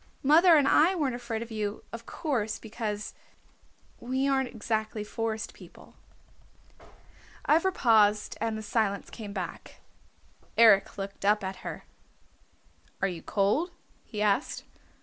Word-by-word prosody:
Mother 325 +5 +7
and 285 -3 +4
I 340 +7 +5
weren't 285 -7 0
afraid 235 -2 -4
of 235 - -12
you, 210 -1 -3
of 230 0 -8
course, 230 -10 -2
because, 215 -2 -5 0.9
we 260 +3 -1
aren't 265 -2 +1
exactly 220 -1 -3
Forest 220 +1 -4
People." - - -15 1.5
Ivra 330 +5 +4
paused 215 - +3
and 225 -1 -1
the 215 - -6
silence 205 -2 -1
came 210 -3 -8
back. 190 -3 -7 0.8
Eric 220 -5 +6
looked 195 0 -6
up 210 +1 +3
at 190 0 -4
her. - - -7 1.2
"Are 195 - +1
you 175 -3 -5
cold?" 210 - +1 0.3
he 210 -1 -4
asked. 210 +6 0
220 Hz, 130 wpm, -28 LUFS, 210-260 Hz, 1.5 s, Mother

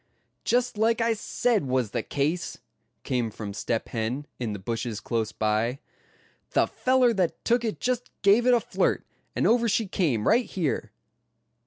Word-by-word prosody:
"Just 245 -3 +1
like 225 +1 +3
I 230 0 +2
said 225 - 0
was 125 -4 0
the 120 - -1
case," 150 +8 -2 0.5
came 125 -3 0
from 105 -1 -7
Step 110 +2 -2
Hen, 120 +5 -2
in 120 -3 -2
the 105 - -4
bushes 115 +2 -3
close 110 -2 -2
by. 110 +4 0 0.8
"The - - +4
feller 255 -2 +2
that 185 -5 -1
took 240 0 +3
it 220 -2 -2
just 250 -1 -1
gave 210 +5 +5
it 250 - +7
a - - +4
flirt, - - 0 0.3
and - - +1
over 235 0 +4
she 220 +2 +1
came, 145 - 0
right 240 +2 +4
here. 175 -8 -2
165 Hz, 165 wpm, -26 LUFS, -, 0.8 s, it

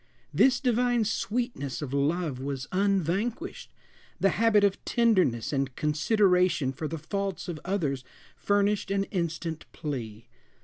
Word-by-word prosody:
This 260 -2 +4
divine 245 -2 +2
sweetness 205 - -2
of 135 -2 -5
love 145 0 0
was 135 0 -4
unvanquished; 200 - -1 0.5
the 195 - +4
habit 210 0 +3
of 200 -1 +1
tenderness 185 - +2
and 135 -2 -1
consideration 175 - +2
for 155 +3 -4
the 165 - -4
faults 195 +4 -3
of 170 -3 -4
others 155 -9 -1 0.3
furnished 205 0 +1
an 195 0 +1
instant 165 -3 -3
plea. 120 -8 -5
180 Hz, 125 wpm, -28 LUFS, 145-205 Hz, 0.5 s, This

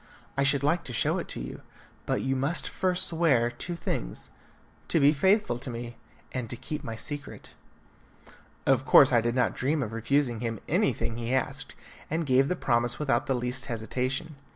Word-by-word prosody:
I 140 - +1
should 140 0 +3
like 165 +5 +2
to 125 - -5
show 110 - +1
it - - -5
to - - -6
you, - - -7 0.5
but - - 0
you 135 0 0
must 140 +6 0
first 180 -1 0
swear 145 -8 +2
two 170 +9 -5
things: - - -4 0.6
to 165 - +2
be 145 +1 +6
faithful 175 - +2
to 125 - -5
me, 120 0 -6 0.4
and 125 -3 -4
to - - -4
keep 140 +5 -5
my 115 -4 -5
secret." 145 +5 -6 1.1
Of - - +3
course - - +7
I 120 - +5
did 120 +1 -1
not 125 -2 +2
dream 140 +3 0
of 110 -2 -5
refusing 120 +1 +1
him 115 -2 -3
anything 115 - 0
he 120 +2 -1
asked, 130 - -2 0.3
and 160 +1 -1
gave 135 0 +4
the 180 - 0
promise 120 -4 +1
without 135 -6 0
the 135 - +1
least 125 +2 -3
hesitation. 130 +6 -3
130 Hz, 185 wpm, -28 LUFS, 120-145 Hz, 1.1 s, course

